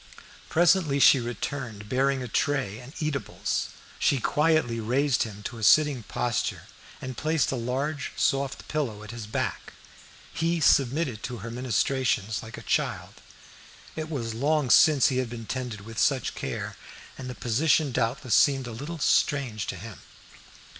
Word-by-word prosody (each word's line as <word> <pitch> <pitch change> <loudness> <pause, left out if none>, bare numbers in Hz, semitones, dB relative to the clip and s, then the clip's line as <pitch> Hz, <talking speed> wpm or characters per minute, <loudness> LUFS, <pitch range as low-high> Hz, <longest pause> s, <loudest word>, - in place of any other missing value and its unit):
Presently 170 -4 +3
she 135 - +7
returned, 115 -2 -5
bearing 135 +3 +1
a - - -5
tray 125 -4 -1
and 125 +2 -11
eatables. 150 -4 -2 0.3
She 140 - +3
quietly 150 -4 +1
raised 125 +4 +1
him 105 -2 -4
to 115 +2 -6
a - - -7
sitting 145 +1 +5
posture, 120 +2 -2 0.4
and 130 -1 -6
placed 155 +1 0
a - - -1
large 135 +5 -2
soft 140 -1 0
pillow 120 -9 -3
at 105 - -8
his 115 -3 -7
back. 105 - -3 0.6
He 165 +1 0
submitted 135 -4 +2
to 125 -1 -5
her 115 - -5
ministrations 120 -2 0
like 110 - -9
a - - -9
child. - - -2 0.7
It 155 0 -4
was 120 -7 -3
long 140 +2 +1
since 145 -6 +6
he 130 - -1
had 130 -2 -1
been 115 -1 -7
tended 125 -4 -4
with 115 +3 -7
such 135 -5 +1
care, - - -5 0.4
and 130 -1 -7
the 125 - -6
position 140 +5 +2
doubtless 120 +1 -1
seemed 135 -2 +4
a 120 - -6
little 145 +9 -6
strange 135 -7 +1
to - - -3
him. 100 +3 -9
130 Hz, 155 wpm, -27 LUFS, 115-145 Hz, 0.7 s, she